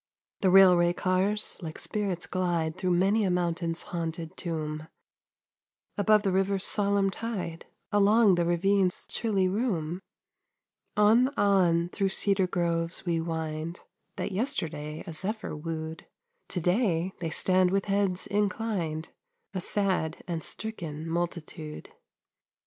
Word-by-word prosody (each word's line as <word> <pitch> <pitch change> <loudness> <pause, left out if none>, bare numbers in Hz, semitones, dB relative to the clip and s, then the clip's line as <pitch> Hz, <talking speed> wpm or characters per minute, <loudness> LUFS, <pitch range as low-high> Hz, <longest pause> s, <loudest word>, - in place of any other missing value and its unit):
The 190 - +3
railway 180 -2 +7
cars 190 +4 0
like 160 -2 -6
spirits 200 -5 -2
glide 170 -4 -1
Through 185 - -2
many 200 +5 +3
a 195 - +1
mountain's 170 -1 -1
haunted 165 -1 -4
tomb, 155 -2 -4 1.1
Above 210 0 +4
the 195 - +1
river's 195 +1 +1
solemn 200 -1 +2
tide, 190 -7 -5 0.2
Along 205 0 +5
the 175 -1 +2
ravine's 185 +2 +2
chilly 200 -5 0
room; 185 -5 -1 1.0
On, 220 +5 +5
on, 175 -4 +3
through 195 +1 0
cedar 195 -1 +1
groves 170 -1 -1
we 170 -2 0
wind, 160 0 -4 0.3
That - - -3
yesterday 160 - -3
a 165 - -7
zephyr 200 +4 -2
wooed; 160 +1 -5 0.4
To 180 - -2
day 180 -1 +1
they 165 -2 -2
stand 185 +2 +3
with 195 +1 0
heads 195 -2 0
inclined, 200 -6 -1 0.4
A 185 - -2
sad 185 -5 0
and 170 -2 -3
stricken 165 -8 -5
multitude. 165 -2 -4
180 Hz, 120 wpm, -28 LUFS, 165-200 Hz, 1.1 s, railway